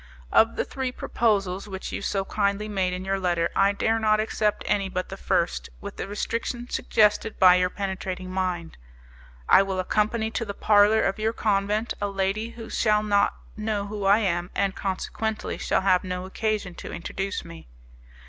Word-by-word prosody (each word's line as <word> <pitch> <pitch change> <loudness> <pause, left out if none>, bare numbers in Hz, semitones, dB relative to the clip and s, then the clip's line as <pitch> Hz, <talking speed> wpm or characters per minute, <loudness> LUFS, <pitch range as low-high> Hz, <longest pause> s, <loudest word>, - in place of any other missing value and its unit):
"Of 225 +1 +4
the - - -1
three 260 -2 -3
proposals 200 -6 0
which 190 -1 -6
you - - -4
so 195 -1 -1
kindly 200 +1 0
made 190 -3 0
in 180 +1 -4
your 195 0 0
letter, 175 -2 0
I 195 +1 +4
dare 225 +2 +1
not 215 -1 +3
accept 215 -1 0
any 200 -2 0
but 185 0 -3
the 195 - -5
first, 170 -2 -1
with 200 0 -8
the - - -4
restriction 230 +4 -3
suggested 215 -2 +2
by 185 -1 +8
your 180 0 +2
penetrating 190 -1 -4
mind. 180 -3 -2 0.7
I - - +7
will 195 -1 -2
accompany 215 +4 0
to 230 - -2
the 200 -3 -5
parlour 210 +1 +4
of 195 +2 0
your 220 +1 0
convent 210 +1 0
a 205 - +1
lady 200 +3 -1
who 230 -1 -9
shall 210 -2 +2
not 205 -1 +2 0.2
know 215 -2 -2
who 205 0 -5
I 200 +2 +6
am, 175 -5 0
and, 195 -1 +1
consequently, 215 +3 -3
shall - - +1
have 185 -1 +3
no 180 0 -4
occasion 210 -1 -2
to - - -7
introduce 195 +3 -4
me. 80 -3 -11
200 Hz, 180 wpm, -25 LUFS, 190-215 Hz, 0.7 s, by